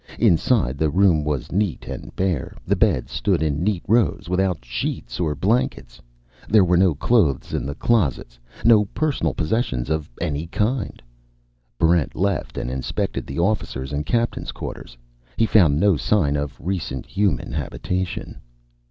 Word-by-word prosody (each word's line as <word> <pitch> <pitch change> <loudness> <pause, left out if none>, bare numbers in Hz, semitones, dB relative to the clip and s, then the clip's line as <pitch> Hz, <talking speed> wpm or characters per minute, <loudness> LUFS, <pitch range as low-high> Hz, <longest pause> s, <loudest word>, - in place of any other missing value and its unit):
Inside, 80 - +2
the 80 0 +2
room 90 -2 +3
was 75 -4 -2
neat 100 -2 -1
and - - -7
bare. 90 -8 -1
The - - +2
beds 65 - +1
stood 80 - 0
in 75 +1 0
neat 100 -3 0
rows, 110 -7 +2
without 90 -6 0
sheets - - -4
or 80 -4 0
blankets. 70 - -1 0.5
There 105 -3 +6
were 90 0 +3
no 90 -3 +4
clothes 85 - +1
in - - -2
the 70 - -4
closets, 70 - 0 0.3
no 110 -3 +6
personal 150 +8 -1
possessions 75 - -1
of 80 -2 -1
any 80 -1 -2
kind. 110 +7 -2 0.7
Barrent 85 0 +2
left 100 -2 -1
and 60 - -3
inspected 65 -1 -3
the 70 - -6
officers' 85 -8 -1
and 75 +1 -1
captain's 120 +6 -1
quarters. - - -8 0.4
He 115 - +4
found 85 -9 +4
no 100 -2 +4
sign 75 -5 +1
of 70 -2 -3
recent 80 -7 -3
human 95 -14 0
habitation. 85 +5 -3
85 Hz, 150 wpm, -22 LUFS, 70-100 Hz, 0.7 s, There